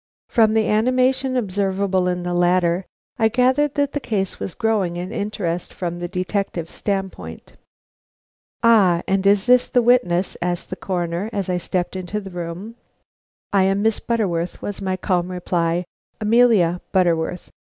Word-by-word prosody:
From 220 Hz, -2 st, +3 dB
the 220 Hz, -1 st, +2 dB
animation 255 Hz, +4 st, +2 dB
observable 195 Hz, -3 st, 0 dB
in 180 Hz, -1 st, -1 dB
the 175 Hz, 0 st, -2 dB
latter, 175 Hz, 0 st, +2 dB, 0.3 s
I 225 Hz, -, +5 dB
gathered 260 Hz, +5 st, +2 dB
that 285 Hz, -1 st, +1 dB
the 290 Hz, -, -1 dB
case 195 Hz, -8 st, -2 dB
was 185 Hz, -, -5 dB
growing 210 Hz, -7 st, 0 dB
in 180 Hz, +3 st, -5 dB
interest 200 Hz, -5 st, -3 dB
from 175 Hz, -1 st, -4 dB
the 175 Hz, -, -3 dB
detective 180 Hz, -2 st, -3 dB
standpoint. 195 Hz, -2 st, -5 dB, 1.1 s
"Ah, 195 Hz, -7 st, +5 dB
and 195 Hz, 0 st, +1 dB
is 200 Hz, 0 st, +4 dB
this 250 Hz, 0 st, +5 dB
the 245 Hz, -, +2 dB
witness?" 210 Hz, -7 st, +2 dB
asked 175 Hz, 0 st, -3 dB
the -, -, -2 dB
Coroner, 175 Hz, +1 st, -3 dB
as 200 Hz, -4 st, -3 dB
I 180 Hz, -, +1 dB
stepped 175 Hz, +1 st, -2 dB
into 185 Hz, +3 st, -3 dB
the 195 Hz, -2 st, -9 dB
room. 175 Hz, +6 st, -6 dB, 0.8 s
"I 195 Hz, -1 st, +4 dB
am 195 Hz, +1 st, +1 dB
Miss 220 Hz, -1 st, +2 dB
Butterworth," 180 Hz, -7 st, -1 dB
was 205 Hz, -1 st, -5 dB
my 190 Hz, -1 st, -1 dB
calm 180 Hz, -2 st, 0 dB
reply. 175 Hz, -1 st, -1 dB, 0.3 s
"Amelia 215 Hz, -6 st, +3 dB
Butterworth. 175 Hz, -2 st, 0 dB
190 Hz, 155 wpm, -21 LUFS, 175-220 Hz, 1.1 s, I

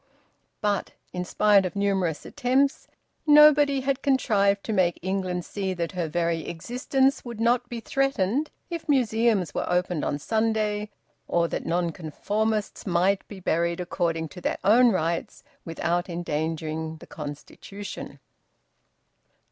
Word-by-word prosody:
But, 205 Hz, -2 st, -1 dB, 0.2 s
in 180 Hz, -, -2 dB
spite 205 Hz, +2 st, +4 dB
of 185 Hz, 0 st, -4 dB
numerous 195 Hz, -5 st, 0 dB
attempts, 275 Hz, +1 st, +1 dB, 0.4 s
nobody 295 Hz, -2 st, +7 dB
had 270 Hz, 0 st, -1 dB
contrived 205 Hz, -7 st, +2 dB
to 220 Hz, -, -3 dB
make 180 Hz, -4 st, +2 dB
England 185 Hz, -2 st, -2 dB
see 190 Hz, -2 st, -3 dB
that 170 Hz, -2 st, -2 dB
her 175 Hz, -3 st, -2 dB
very 165 Hz, 0 st, -1 dB
existence 260 Hz, -, 0 dB
would 235 Hz, -3 st, -7 dB
not 240 Hz, +1 st, +2 dB
be 235 Hz, -1 st, -5 dB
threatened 270 Hz, +1 st, 0 dB, 0.2 s
if 335 Hz, -2 st, -5 dB
museums 225 Hz, -, +2 dB
were -, -, -2 dB
opened 180 Hz, -2 st, 0 dB
on 145 Hz, -, -1 dB
Sunday, 215 Hz, +2 st, 0 dB, 0.4 s
or 170 Hz, 0 st, +2 dB
that -, -, -4 dB
Nonconformists 180 Hz, +7 st, -2 dB
might 185 Hz, +2 st, +1 dB
be 200 Hz, -, -9 dB
buried 170 Hz, 0 st, 0 dB
according 165 Hz, -2 st, -1 dB
to 180 Hz, -, -11 dB
their -, -, -1 dB
own 235 Hz, +4 st, +6 dB
rites 170 Hz, -2 st, -2 dB, 0.2 s
without 170 Hz, +2 st, -1 dB
endangering 160 Hz, -1 st, -3 dB
the -, -, -13 dB
constitution. 155 Hz, +7 st, -8 dB
195 Hz, 130 wpm, -26 LUFS, 170-230 Hz, 0.4 s, nobody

